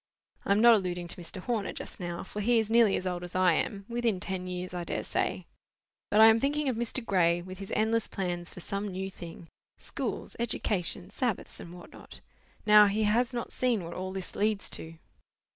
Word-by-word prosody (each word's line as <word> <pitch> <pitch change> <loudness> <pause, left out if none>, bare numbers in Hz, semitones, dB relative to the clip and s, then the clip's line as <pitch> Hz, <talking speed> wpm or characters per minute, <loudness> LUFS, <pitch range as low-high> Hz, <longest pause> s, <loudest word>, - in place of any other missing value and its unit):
I - - 0
am 205 +2 +4
not 235 0 +8
alluding 180 -4 -1
to 175 - -5
Mr. 170 - -8
Horner 220 -2 -2
just - - -8
now, 175 -1 -4
for 210 +2 -6
he 235 +3 +3
is 220 -1 0
nearly 230 -3 +5
as 185 - -3
old 180 -1 -2
as 175 0 -8
I 185 -2 +4
am—within 215 +3 -1
ten 185 0 -4
years, 180 0 -5
I 175 -1 -3
dare - - -3
say—but 210 - -4
I 220 - +10
am 225 0 +7
thinking 290 +3 0
of 255 - +1
Mr. 235 +1 -1
Gray, 175 -4 +3
with 185 +1 -9
his 195 - -8
endless 220 +1 +1
plans 175 -2 -3
for 180 - -8
some 200 +3 -3
new 190 0 -4
thing—schools, 170 -2 -7
education, 200 -5 0
Sabbaths, 240 -1 -2
and 170 - -9
what 175 - -12
not. - - -13 0.5
Now 210 -1 +8
he 210 +2 0
has 235 +4 +2
not 240 -2 -4
seen 240 -6 +1
what 170 +1 -7
all 185 +1 -4
this 190 -1 -6
leads 210 -1 0
to." 165 0 -6
200 Hz, 200 wpm, -29 LUFS, 180-225 Hz, 0.5 s, I